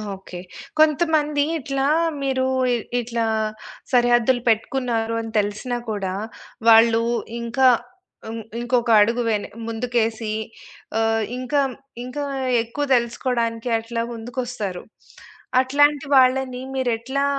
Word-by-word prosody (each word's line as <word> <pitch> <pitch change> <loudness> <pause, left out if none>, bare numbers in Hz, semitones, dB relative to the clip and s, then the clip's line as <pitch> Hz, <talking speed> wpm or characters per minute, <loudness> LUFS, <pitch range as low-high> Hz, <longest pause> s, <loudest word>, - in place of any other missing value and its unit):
Okay. 190 -2 -10 0.4
కొంతమంది 305 -1 +3 0.2
ఇట్లా 275 0 -2 0.4
మీరు 260 -1 0 0.5
ఇట్లా 235 -1 -2 0.7
సరిహద్దులు 245 0 +3
పెట్టుకున్నారు 230 0 0
అని 225 -1 -7
తెలిసినా 210 +4 -2
కూడా 195 -3 -2 0.6
వాళ్ళు 225 0 +6 0.4
ఇంకా 245 +3 +2 0.6
ఇం 225 - -5 0.2
ఇంకొక 240 0 0
అడుగు 230 +3 +2
వెన 215 -2 0 0.2
ముందుకేసి 225 -1 -1 0.7
ఆహ్, 225 0 +1
ఇంకా 255 +3 0 0.4
ఇంకా 270 +4 -5 0.4
ఎక్కువ 285 +6 -3
తెలుసుకోవడానికి 235 -1 -1
అట్లా 230 +1 -4
ముందుకొస్తారు. 230 -5 -5 0.8
అట్లాంటి 290 +2 +3
వాళ్ళని 255 -1 +3
మీరేట్లా 260 +2 -1
240 Hz, 95 wpm, -22 LUFS, 225-260 Hz, 0.8 s, వాళ్ళు